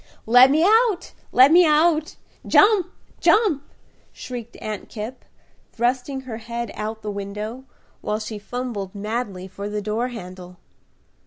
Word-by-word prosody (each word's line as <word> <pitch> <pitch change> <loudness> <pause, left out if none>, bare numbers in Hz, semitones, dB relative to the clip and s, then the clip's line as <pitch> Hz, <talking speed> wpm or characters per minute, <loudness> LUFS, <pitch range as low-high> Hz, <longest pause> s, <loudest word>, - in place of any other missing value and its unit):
"Let 245 +3 +7
me 305 +4 +3
out! 440 -2 +3 0.2
Let 260 +3 +6
me 355 +2 +7
out! 310 0 +2 0.3
Jump! 400 -4 +5 0.3
Jump!" 410 -10 +3 0.5
shrieked 240 -2 -8
Aunt 215 -2 -6
Kipp, 225 +4 -7 0.5
thrusting 255 +3 -1
her 245 -4 -7
head 235 0 -5
out 215 +1 -4
of - - -30
the 210 - -3
window, 210 +5 -6 0.4
while 210 - -2
she 215 -1 -6
fumbled 215 -4 -5
madly 205 -3 -4
for 200 +2 -7
the 210 0 -3
door 215 +4 -2
handle. 180 -6 -9
235 Hz, 140 wpm, -22 LUFS, 210-270 Hz, 0.5 s, Let